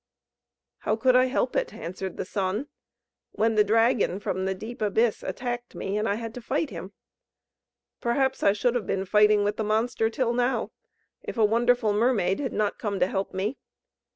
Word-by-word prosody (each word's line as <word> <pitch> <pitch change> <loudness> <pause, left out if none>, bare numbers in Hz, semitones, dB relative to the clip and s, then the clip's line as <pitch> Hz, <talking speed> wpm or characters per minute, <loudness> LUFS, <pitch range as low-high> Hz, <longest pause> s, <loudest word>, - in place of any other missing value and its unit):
"How 215 - 0
could 255 +3 +3
I 255 0 +6
help 260 +2 -1
it?" - - -1
answered 185 +1 -6
the - - -3
Sun; 195 +6 -2 0.7
"When 225 +2 +2
the 215 -1 +5
dragon 225 -2 +2
from 190 -2 -2
the 190 0 -1
deep 225 +6 -8
abyss 215 +2 +1
attacked 245 -1 -4
me, 195 +1 -3
and 210 +1 0
I 200 - +1
had 225 0 -6
to 245 - -8
fight 275 +5 -1
him? 185 +2 -8 1.1
Perhaps 265 +2 0
I 200 - +5
should 235 +3 +1
have 245 -4 -2
been 190 0 -1
fighting 210 +1 +4
with 205 +1 -1
the 220 - -1
monster 225 +1 +1
till 235 +1 0
now, 245 +2 0 0.5
if - - -7
a 220 - +5
wonderful 235 0 +2
mermaid 210 -4 +2
had 270 -3 -2
not 210 -1 -1
come 200 -3 -2
to - - +4
help 195 +1 -2
me. 205 +8 -3
220 Hz, 185 wpm, -26 LUFS, 200-245 Hz, 1.1 s, I